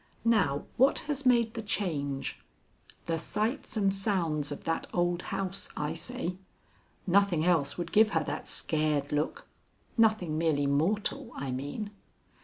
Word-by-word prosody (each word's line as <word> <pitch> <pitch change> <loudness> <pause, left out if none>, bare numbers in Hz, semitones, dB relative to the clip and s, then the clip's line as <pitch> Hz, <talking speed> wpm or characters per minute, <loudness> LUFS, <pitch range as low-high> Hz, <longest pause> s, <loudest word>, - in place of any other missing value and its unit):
Now 185 -12 +3
what 265 +3 +5
has 285 -3 -1
made 235 -3 +4
the 230 - -4
change? 145 -10 -2 0.7
The 165 -1 -1
sights 220 - -2
and 195 -2 +2
sounds 170 -7 0
of 145 - -6
that 165 - -1
old 175 0 +1
house, 195 0 -3
I 150 +1 -1
say. 180 +1 -4 0.7
Nothing 190 -3 +3
else 160 -6 +2
would 170 -1 -4
give 215 +1 +6
her 160 - +2
that - - -4
scared 150 -2 0
look 150 +1 -1 0.5
nothing 215 -9 +3
merely 155 -4 +2
mortal, 205 - 0
I 135 -1 -3
mean." 145 - -4
175 Hz, 140 wpm, -30 LUFS, 150-215 Hz, 0.7 s, give